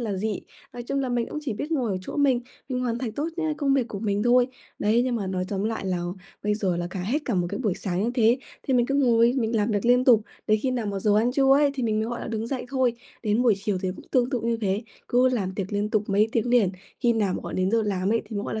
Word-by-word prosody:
là 220 Hz, -4 st, -2 dB
dị. 210 Hz, +1 st, -2 dB, 0.3 s
Nói 240 Hz, -, -6 dB
chung 275 Hz, +3 st, -2 dB
là 265 Hz, -, -1 dB
mình 240 Hz, -1 st, 0 dB
cũng -, -, -4 dB
chỉ 275 Hz, -6 st, -2 dB
biết 285 Hz, +9 st, -5 dB
ngồi 255 Hz, -8 st, 0 dB
ở 185 Hz, -, -1 dB
chỗ 185 Hz, -, -7 dB
mình, 270 Hz, -4 st, +3 dB, 0.3 s
mình 250 Hz, -1 st, -2 dB
hoàn 240 Hz, -2 st, -1 dB
thành 240 Hz, -4 st, -3 dB
tốt 295 Hz, +7 st, -2 dB
nhá 320 Hz, -2 st, 0 dB
công 275 Hz, -2 st, +2 dB
việc 255 Hz, -4 st, +1 dB
của 205 Hz, -, -5 dB
mình 205 Hz, -1 st, 0 dB
thôi. 245 Hz, +1 st, +4 dB, 0.3 s
Đấy, 220 Hz, +3 st, +3 dB
nhưng 255 Hz, -1 st, 0 dB
mà 205 Hz, -4 st, -3 dB
nói 185 Hz, -1 st, -2 dB
tóm 200 Hz, 0 st, -2 dB
lại 220 Hz, -2 st, -2 dB
là 185 Hz, -1 st, 0 dB, 0.4 s
bây 210 Hz, 0 st, +1 dB
giờ 190 Hz, -4 st, 0 dB
là 175 Hz, 0 st, -2 dB
cả 190 Hz, -, -4 dB
hết 240 Hz, +11 st, 0 dB
cả 235 Hz, -, -1 dB
một 175 Hz, -1 st, +1 dB
cái -, -, -3 dB
buổi 215 Hz, -8 st, 0 dB
sáng 185 Hz, -1 st, -2 dB
như 235 Hz, -, +1 dB
thế, 235 Hz, +1 st, +4 dB, 0.2 s
thì 265 Hz, -, 0 dB
mình 240 Hz, -1 st, +3 dB
cứ 275 Hz, -, -1 dB
ngồi 240 Hz, -4 st, +4 dB
mình 230 Hz, -1 st, 0 dB
làm 210 Hz, +1 st, +1 dB
việc 205 Hz, -1 st, 0 dB
liên 250 Hz, +1 st, +5 dB
tục, 235 Hz, -4 st, +6 dB, 0.2 s
đến 215 Hz, 0 st, +3 dB
khi 265 Hz, -, +1 dB
nào 245 Hz, -4 st, -2 dB
mà 200 Hz, -1 st, -2 dB
giờ 205 Hz, +1 st, +2 dB
ăn 235 Hz, +3 st, +2 dB
trưa 270 Hz, 0 st, +4 dB
ấy 285 Hz, 0 st, +4 dB
thì 265 Hz, -, -3 dB
mình 215 Hz, -2 st, +1 dB
mới, 220 Hz, -, -1 dB
gọi 240 Hz, 0 st, -4 dB
là, -, -, -5 dB
đứng 225 Hz, 0 st, -3 dB
dậy 255 Hz, -1 st, -4 dB
thôi. 260 Hz, -2 st, +2 dB, 0.3 s
Đến 215 Hz, +1 st, +2 dB
buổi 235 Hz, -4 st, +5 dB
chiều 205 Hz, -4 st, 0 dB
thì 190 Hz, -, 0 dB
cũng -, -, -12 dB
tương 250 Hz, -1 st, +2 dB
tự 250 Hz, -5 st, -1 dB
như 230 Hz, 0 st, 0 dB
thế, 200 Hz, 0 st, 0 dB, 0.3 s
cứ 250 Hz, +1 st, +4 dB
làm 205 Hz, -7 st, -1 dB
tiệc 195 Hz, -1 st, -4 dB
liên 205 Hz, +1 st, -1 dB
tục 215 Hz, -1 st, +1 dB
mấy 205 Hz, +2 st, +3 dB
tiếng 230 Hz, +1 st, 0 dB
liền, 235 Hz, -7 st, +4 dB, 0.3 s
khi 240 Hz, -2 st, +3 dB
nào 205 Hz, -5 st, 0 dB
mà -, -, -3 dB
gọi -, -, -6 dB
đến 185 Hz, +1 st, +1 dB
giờ 225 Hz, 0 st, +2 dB
làm 195 Hz, -1 st, 0 dB
ấy 230 Hz, -, +1 dB
thì 220 Hz, -, -7 dB
mới, 205 Hz, -, -2 dB
gọi -, -, -4 dB
là, 220 Hz, -, -2 dB
230 Hz, 310 wpm, -25 LUFS, 205-250 Hz, 0.4 s, tục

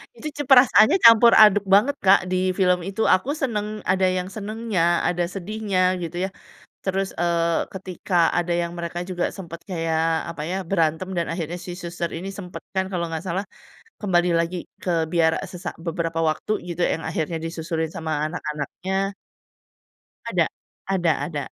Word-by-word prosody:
Itu 310 Hz, -, -7 dB
cu 290 Hz, -, -1 dB
perasannya 250 Hz, -, +7 dB
campur 230 Hz, 0 st, +8 dB
aduk 205 Hz, -2 st, +7 dB
banget, 210 Hz, +9 st, +4 dB
Kak, 195 Hz, +1 st, +7 dB
di 185 Hz, 0 st, +1 dB
film 180 Hz, -1 st, +2 dB
itu. 200 Hz, +3 st, -4 dB
Aku 190 Hz, +10 st, +3 dB
seneng 215 Hz, -7 st, -3 dB
ada 185 Hz, 0 st, +2 dB
yang 185 Hz, 0 st, 0 dB
senengnya, 205 Hz, -5 st, 0 dB
ada 175 Hz, 0 st, 0 dB
sedihnya 185 Hz, 0 st, -1 dB
gitu 175 Hz, +1 st, -4 dB
ya. 190 Hz, -, -4 dB, 0.6 s
Terus, 195 Hz, 0 st, -1 dB
eee, 170 Hz, -1 st, +1 dB
ketika 185 Hz, -2 st, 0 dB
ada 175 Hz, 0 st, 0 dB
yang 170 Hz, 0 st, -1 dB
mereka 170 Hz, +1 st, -4 dB
juga 180 Hz, -1 st, -2 dB
sempet 170 Hz, -3 st, -8 dB
kayak 165 Hz, -3 st, -1 dB, 0.3 s
apa 155 Hz, -, -7 dB
ya, 185 Hz, -, -1 dB
berantem 165 Hz, 0 st, 0 dB
dan 170 Hz, -2 st, -1 dB
akhirnya 170 Hz, 0 st, -4 dB
si 180 Hz, -, -7 dB
suster 175 Hz, -1 st, -4 dB
ini 185 Hz, +4 st, -5 dB
sempet 180 Hz, -2 st, -8 dB
kan 190 Hz, 0 st, +1 dB
kalau 175 Hz, -2 st, -1 dB
nggak 160 Hz, +2 st, -4 dB
salah, 185 Hz, +3 st, -2 dB, 0.6 s
kembali 180 Hz, -4 st, +2 dB
lagi 170 Hz, +2 st, -1 dB, 0.3 s
ke 185 Hz, -, 0 dB, 0.2 s
biara, 165 Hz, -2 st, +3 dB
eee, -, -, -7 dB
se 180 Hz, -, -8 dB
sak -, -, -4 dB
beberapa 165 Hz, -1 st, -2 dB
waktu, 155 Hz, -, -3 dB, 0.2 s
gitu. 175 Hz, +1 st, -4 dB
Yang 165 Hz, -, -1 dB
akhirnya 165 Hz, 0 st, -2 dB
disusurin 160 Hz, -1 st, -3 dB
sama 160 Hz, -1 st, -4 dB, 0.2 s
anak-anaknya 180 Hz, +5 st, -3 dB, 1.2 s
Ada, -, -, +2 dB, 0.4 s
ada 180 Hz, -4 st, +1 dB, 0.2 s
ada. 150 Hz, -4 st, -4 dB
180 Hz, 165 wpm, -23 LUFS, 170-195 Hz, 1.2 s, campur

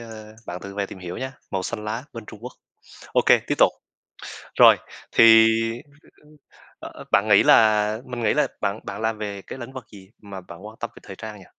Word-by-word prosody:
ơ, 110 Hz, -2 st, -11 dB
bạn 90 Hz, +1 st, -6 dB
tự 100 Hz, 0 st, -9 dB
về 100 Hz, -1 st, -2 dB
tìm 95 Hz, -, -11 dB
hiểu 90 Hz, -1 st, -7 dB
nhá, 130 Hz, +1 st, -7 dB
màu 95 Hz, -1 st, -2 dB
xanh 105 Hz, +2 st, -5 dB
lá 115 Hz, +4 st, -4 dB
bên 115 Hz, -2 st, -9 dB
Trung 105 Hz, -, -12 dB
Quốc. 125 Hz, +1 st, -8 dB, 0.6 s
OK, -, -, +2 dB, 0.2 s
tiếp -, -, 0 dB
tục. -, -, +5 dB, 0.9 s
Rồi, -, -, +8 dB, 0.3 s
thì, -, -, +5 dB, 0.8 s
ưm, -, -, -25 dB, 0.2 s
ưm, 150 Hz, 0 st, -20 dB, 0.4 s
ơ, -, -, -8 dB
ơ, -, -, -11 dB
bạn 100 Hz, +2 st, +3 dB
nghĩ 105 Hz, -2 st, +6 dB
là 110 Hz, -1 st, +4 dB
mình 125 Hz, -2 st, -6 dB
nghĩ -, -, +2 dB
là -, -, +2 dB
bạn 100 Hz, +2 st, -2 dB
bạn 100 Hz, +1 st, -6 dB
làm 110 Hz, 0 st, -1 dB
về 100 Hz, -2 st, -6 dB
cái 130 Hz, -, -10 dB
lĩnh 130 Hz, +1 st, -9 dB
vực 130 Hz, -4 st, -9 dB
gì 95 Hz, -2 st, -15 dB
mà 100 Hz, -2 st, -9 dB
bạn 90 Hz, +2 st, -13 dB
quan 110 Hz, +1 st, -11 dB
tâm 115 Hz, -, -4 dB
về -, -, -13 dB
thời 95 Hz, -, -10 dB
trang 110 Hz, 0 st, -9 dB
nhỉ? 95 Hz, -, -15 dB
105 Hz, 230 wpm, -23 LUFS, 100-115 Hz, 0.9 s, Rồi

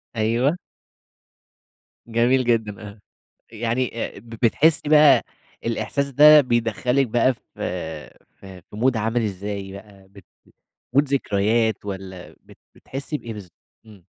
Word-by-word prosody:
أيوه. 115 Hz, +9 st, +1 dB, 1.5 s
جميل 120 Hz, +3 st, +2 dB
جدًا، 110 Hz, -4 st, -1 dB
آه 100 Hz, -, -15 dB, 0.5 s
يعني 115 Hz, +2 st, -2 dB, 0.2 s
آآ، -, -, -10 dB
ب 115 Hz, -, -18 dB
بتحسي 140 Hz, +7 st, +1 dB
بقى 150 Hz, -1 st, +6 dB, 0.4 s
الإحساس 115 Hz, +5 st, -2 dB
ده 150 Hz, +3 st, +7 dB
بيدخل 120 Hz, -1 st, -1 dB
لِك 135 Hz, -2 st, +3 dB
بقى 120 Hz, +3 st, +2 dB
ف -, -, -26 dB, 0.8 s
في 95 Hz, -2 st, -12 dB
مود 120 Hz, +2 st, +1 dB
عامل 115 Hz, +2 st, 0 dB
إزاي 100 Hz, -1 st, -5 dB
بقى؟ 100 Hz, -1 st, -14 dB
بت 100 Hz, -2 st, -17 dB, 0.7 s
مود 140 Hz, +2 st, +3 dB
ذكريات 110 Hz, -4 st, 0 dB
والَّا 95 Hz, -2 st, -8 dB
بت -, -, -18 dB, 0.2 s
بتحسي 140 Hz, +3 st, -6 dB
بإيه 115 Hz, -2 st, -8 dB
بالضب 100 Hz, -5 st, -11 dB, 0.3 s
إمم. 100 Hz, -5 st, -17 dB
115 Hz, 125 wpm, -22 LUFS, 105-130 Hz, 1.5 s, ده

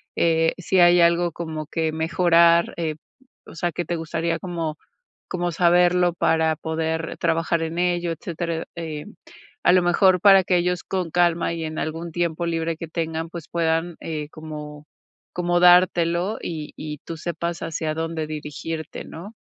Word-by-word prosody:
eh, 165 Hz, -1 st, +2 dB
si 185 Hz, +1 st, +1 dB
hay 175 Hz, 0 st, +6 dB
algo 170 Hz, 0 st, +3 dB
como 155 Hz, -2 st, -5 dB
que 160 Hz, +1 st, -1 dB
mejorar, 170 Hz, +1 st, +3 dB
eh, 160 Hz, -2 st, -2 dB, 0.5 s
o -, -, -12 dB
sea, 175 Hz, +1 st, -1 dB
que 175 Hz, -, -4 dB
te 175 Hz, -, -2 dB
gustaría 165 Hz, +1 st, -2 dB
como 165 Hz, -4 st, -4 dB, 0.5 s
como 175 Hz, -1 st, -2 dB
saberlo 175 Hz, +1 st, +3 dB
para 160 Hz, -2 st, +2 dB
poder 160 Hz, 0 st, -3 dB
trabajar 165 Hz, 0 st, 0 dB
en 165 Hz, +1 st, -3 dB
ello, 175 Hz, -1 st, 0 dB
etcétera. 165 Hz, 0 st, -4 dB
Eh, 155 Hz, -3 st, -5 dB, 0.6 s
a -, -, +5 dB
lo 185 Hz, 0 st, +5 dB
mejor, 180 Hz, +1 st, +4 dB
para 195 Hz, -2 st, +7 dB
que 180 Hz, 0 st, +2 dB
ellos 180 Hz, 0 st, 0 dB
con 185 Hz, -3 st, -2 dB
calma 170 Hz, 0 st, +2 dB
y 165 Hz, -1 st, -4 dB
en 155 Hz, 0 st, -5 dB
algún 165 Hz, +1 st, -4 dB
tiempo 170 Hz, 0 st, -1 dB
libre 165 Hz, 0 st, -1 dB
que 165 Hz, -, -6 dB
tengan, 160 Hz, 0 st, -3 dB
pues, 170 Hz, -3 st, -8 dB
puedan, 165 Hz, 0 st, 0 dB
eh, 155 Hz, -2 st, -5 dB
como 150 Hz, -2 st, -9 dB, 0.5 s
como 175 Hz, 0 st, 0 dB
dártelo, 175 Hz, +1 st, +4 dB
y 155 Hz, -3 st, -5 dB
y 150 Hz, -1 st, -6 dB
tú 165 Hz, -, -6 dB
sepas 170 Hz, +1 st, -4 dB
hacia 160 Hz, -1 st, -3 dB
dónde 160 Hz, 0 st, -3 dB
dirigirte, 155 Hz, +1 st, -6 dB
¿no? 195 Hz, +7 st, -10 dB
165 Hz, 160 wpm, -23 LUFS, 160-175 Hz, 0.6 s, para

